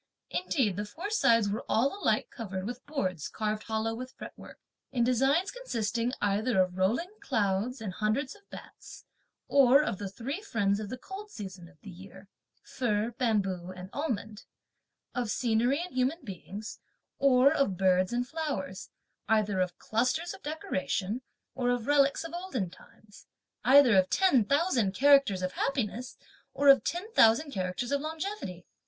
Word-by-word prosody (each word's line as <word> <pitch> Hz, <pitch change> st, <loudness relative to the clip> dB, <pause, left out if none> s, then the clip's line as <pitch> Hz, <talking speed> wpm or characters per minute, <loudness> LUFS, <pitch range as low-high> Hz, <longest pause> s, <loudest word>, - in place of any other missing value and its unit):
Indeed, 255 Hz, -, 0 dB
the 205 Hz, -, -2 dB
four 345 Hz, -, -6 dB
sides 230 Hz, -, +4 dB
were 205 Hz, +3 st, -2 dB
all 265 Hz, -, +2 dB
alike -, -, +1 dB
covered 190 Hz, -5 st, -5 dB
with 245 Hz, +3 st, -6 dB
boards 185 Hz, -, -2 dB
carved 215 Hz, -1 st, -2 dB
hollow 220 Hz, 0 st, -1 dB
with 255 Hz, +3 st, -7 dB
fretwork, -, -, -11 dB, 0.3 s
(in 240 Hz, -3 st, +1 dB
designs 270 Hz, -, +2 dB
consisting) 235 Hz, -, -2 dB
either 205 Hz, +2 st, +1 dB
of 185 Hz, -1 st, +2 dB
rolling 225 Hz, -, 0 dB
clouds 215 Hz, +1 st, -1 dB
and 210 Hz, -4 st, -5 dB
hundreds 220 Hz, -, -1 dB
of 405 Hz, -1 st, -22 dB
bats; -, -, -12 dB, 0.4 s
or 275 Hz, +1 st, +6 dB
of 195 Hz, -, -3 dB
the 200 Hz, -2 st, -4 dB
three 265 Hz, -, -5 dB
friends 205 Hz, -, 0 dB
of 210 Hz, -2 st, -5 dB
the 255 Hz, -, -5 dB
cold 400 Hz, +7 st, -9 dB
season 190 Hz, -, -8 dB
of 180 Hz, -, -23 dB
the 200 Hz, -, -10 dB
year, 190 Hz, +2 st, -13 dB, 0.4 s
(fir, 225 Hz, -2 st, -1 dB
bamboo 195 Hz, -7 st, 0 dB
and 185 Hz, +1 st, -9 dB
almond); 220 Hz, -8 st, -4 dB, 0.7 s
of 245 Hz, -3 st, -2 dB
scenery 240 Hz, +5 st, +1 dB
and 360 Hz, +1 st, -5 dB
human 260 Hz, +6 st, 0 dB
beings, 205 Hz, 0 st, -8 dB, 0.4 s
or 275 Hz, +1 st, +5 dB
of 275 Hz, -, +1 dB
birds 185 Hz, -1 st, +3 dB
or 240 Hz, +1 st, 0 dB
flowers; 255 Hz, -, -4 dB, 0.4 s
either 210 Hz, -3 st, +2 dB
of 180 Hz, -1 st, -1 dB
clusters 255 Hz, +10 st, -1 dB
of -, -, -12 dB
decoration, 240 Hz, -7 st, -2 dB, 0.3 s
or 250 Hz, -1 st, -1 dB
of 245 Hz, -2 st, 0 dB
relics 280 Hz, +1 st, +3 dB
of 330 Hz, 0 st, -8 dB
olden 305 Hz, -, -3 dB
times; 205 Hz, +2 st, -18 dB, 0.4 s
either 260 Hz, -1 st, +7 dB
of 185 Hz, -1 st, +4 dB
ten 320 Hz, -, +4 dB
thousand 265 Hz, -, +2 dB
characters 275 Hz, -9 st, +5 dB
of 185 Hz, -, -1 dB
happiness 250 Hz, -1 st, -2 dB, 0.4 s
or 285 Hz, 0 st, +4 dB
of 275 Hz, -, +7 dB
ten 365 Hz, +6 st, -3 dB
thousand 245 Hz, -, +5 dB
characters 185 Hz, +3 st, -3 dB
of 280 Hz, 0 st, +1 dB
longevity. 315 Hz, -, -5 dB
235 Hz, 160 wpm, -29 LUFS, 200-280 Hz, 0.7 s, either